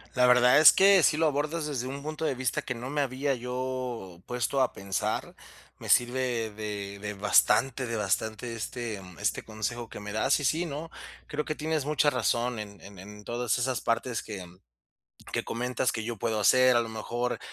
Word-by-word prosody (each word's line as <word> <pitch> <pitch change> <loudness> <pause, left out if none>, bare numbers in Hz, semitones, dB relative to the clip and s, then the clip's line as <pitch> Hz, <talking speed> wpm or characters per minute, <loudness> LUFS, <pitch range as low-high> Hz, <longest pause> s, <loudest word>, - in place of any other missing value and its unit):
La 125 -1 +5
verdad 125 +2 +6
es 155 - +10
que 195 -1 +6
sí 155 - +3
lo 165 - +3
abordas 150 +2 -1
desde 130 -4 -3
un 140 +1 -6
punto 155 +1 -5
de 135 - 0
vista 125 -1 -1
que 125 - -4
no 125 +3 -6
me 145 - 0
había 135 +1 -1
yo 125 -7 -4
puesto 125 +2 0
a 130 - +2
pensar. 95 -2 -3 0.4
Me - - -8
sirve 120 -2 +2
de 105 -1 -6
de 105 0 -4
bastante 105 +6 +3
de 115 - -3
bastante, 110 +3 -2
este 115 -2 -5 0.2
este - - 0
consejo 115 +2 -4
que - - -8
me 105 0 -7
das. 110 +7 +2
Y 145 - -2
sí, 165 +5 +1
no. 155 +3 -6 0.3
Creo 150 0 -3
que 155 - -3
tienes 155 -2 -1
mucha 150 -1 +2
razón 120 -1 0
en 100 -2 -8
en 100 -2 -12
en 105 +2 -11
todas 120 0 -1
esas 125 0 -1
partes 115 +1 -1
que 100 -5 -7 0.9
que - - -2
comentas 125 +2 -1
que 110 - -3
yo 115 0 -4
puedo 110 0 -1
hacer. 130 +3 +5
A 120 - +4
lo 115 - -5
mejor, 120 +2 -3
125 Hz, 195 wpm, -28 LUFS, 110-135 Hz, 0.9 s, es